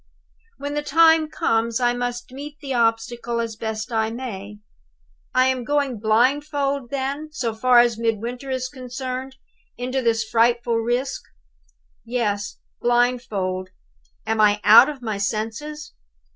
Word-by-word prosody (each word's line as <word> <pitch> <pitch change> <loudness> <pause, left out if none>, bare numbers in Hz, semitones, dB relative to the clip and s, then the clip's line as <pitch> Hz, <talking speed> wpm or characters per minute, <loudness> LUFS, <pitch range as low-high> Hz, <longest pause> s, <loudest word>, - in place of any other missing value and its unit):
When 285 +1 -5
the 295 - -1
time 320 +1 +4
comes, 225 -4 0
I 245 -1 +2
must 245 0 -4
meet 290 +3 -8
the 275 -3 -4
obstacle 235 0 0
as 230 -1 -3
I - - -29
best 220 +1 -4
may. 220 -3 -3 0.8
I 255 0 +5
am 260 -1 0
going 280 -3 0
blindfold, 275 +4 +1
then 280 +3 -3
so 245 -7 -2
far 250 +3 +3
as 235 -2 +1
Midwinter 235 +4 -2
is 260 -1 -2
concerned 255 0 -6 0.4
into 255 +2 -2
this 230 -2 +1
frightful 235 +1 +2
risk? 245 +4 -1 0.8
Yes; 215 -4 -2 0.2
blindfold. 235 -7 0 0.6
Am 220 0 +1
I 210 0 +4
out 230 +6 +8
of 275 -4 -8
my 215 -3 -3
senses? 230 +10 -4
245 Hz, 130 wpm, -22 LUFS, 225-265 Hz, 0.8 s, out